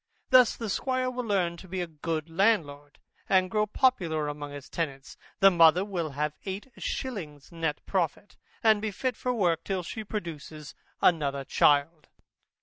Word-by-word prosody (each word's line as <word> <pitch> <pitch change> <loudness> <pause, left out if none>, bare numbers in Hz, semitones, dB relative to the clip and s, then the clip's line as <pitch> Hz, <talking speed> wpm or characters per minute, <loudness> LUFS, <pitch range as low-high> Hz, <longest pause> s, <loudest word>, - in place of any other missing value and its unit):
Thus 255 -2 +6
the 225 - -5
squire 255 +1 -1
will 250 -1 -4
learn 180 -5 0
to 190 - -12
be 185 +1 -4
a 175 - -1
good 160 0 -4
landlord, 160 -6 0 0.3
and 185 -1 +3
grow 215 -1 +1
popular 175 - +1
among 145 0 -6
his 145 -1 -9
tenants, 140 -5 -4 0.3
the 195 0 +8
mother 170 +2 +5
will 170 -7 -3
have 150 0 0
eight 195 +6 -6
shillings 165 - -5
neat 165 -3 -3
profit, 185 +1 -2 0.3
and 220 -2 +5
be 215 - -1
fit 250 +5 -2
for 250 - -2
work 175 -9 +1
till 190 -2 -2
she 220 +6 -6
produces 160 -7 -7 0.3
another 140 -5 +2
child. 150 +3 +2
175 Hz, 160 wpm, -28 LUFS, 150-210 Hz, 0.3 s, the